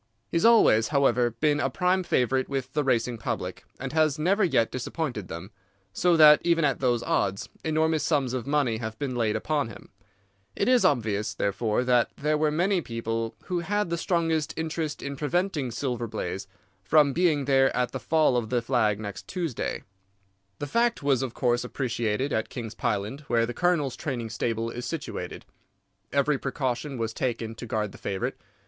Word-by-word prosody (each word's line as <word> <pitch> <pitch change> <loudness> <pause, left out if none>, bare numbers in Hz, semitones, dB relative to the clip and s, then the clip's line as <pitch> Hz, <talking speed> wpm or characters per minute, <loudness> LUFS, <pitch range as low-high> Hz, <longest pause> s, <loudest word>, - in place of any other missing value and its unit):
He - - +1
has 165 - +2
always, 220 - +6
however, 135 -4 +3
been 145 +6 +1
a 135 - +1
prime 180 +6 +1
favourite 130 -6 +1
with 135 -1 -3
the 150 - +1
racing 120 -3 0
public, - - -4
and 135 +1 -5
has 155 -2 +2
never 190 +7 +2
yet 130 -10 +2
disappointed 125 - -4
them, 85 +5 -8 0.4
so 175 +5 +3
that 150 -1 +8
even 170 -2 +3
at 140 -3 +1
those 120 -3 +1
odds 100 0 -1
enormous 160 0 +1
sums 140 -6 +1
of 125 -1 -3
money 140 -6 +1
have 110 -1 -5
been 135 -1 -3
laid 110 -3 +1
upon 145 +4 0
him. - - -12 0.7
It - - 0
is 250 -1 +5
obvious, 110 -5 +1
therefore, 105 +4 0
that 125 -1 +3
there 150 +2 +1
were 155 0 +2
many 180 +5 +1
people 115 -2 -3
who 180 -1 -2
had 205 +1 -1
the - - +2
strongest 165 -3 0
interest 160 -1 -3
in 140 0 -4
preventing 155 -2 0
Silver 120 -1 -3
Blaze 95 -2 -4 0.4
from 145 +5 +4
being 155 -4 +2
there 135 -1 +4
at 125 -1 0
the 135 - -4
fall 155 +3 +2
of 115 -3 -2
the 120 -2 0
flag 110 -5 +1
next 100 -2 -7
Tuesday. 170 - -3 0.7
"The - - -4
fact 235 +3 +1
was, 135 -3 +2
of 130 -3 -4
course, 120 -1 +1
appreciated 125 0 -2
at 110 - -1
King's 115 -3 -6
Pyland, 110 +2 -2
where 115 -1 +2
the 120 - -5
Colonel's 165 -6 +1
training 120 -7 -4
stable 115 0 -2
is 120 - -6
situated. 165 +2 -5 0.7
Every 140 0 +2
precaution 135 0 -2
was 115 -1 -2
taken 115 -3 -2
to 120 +2 -8
guard 105 -2 -1
the - - -13
favourite. 95 -1 -2
135 Hz, 180 wpm, -27 LUFS, 115-155 Hz, 0.7 s, that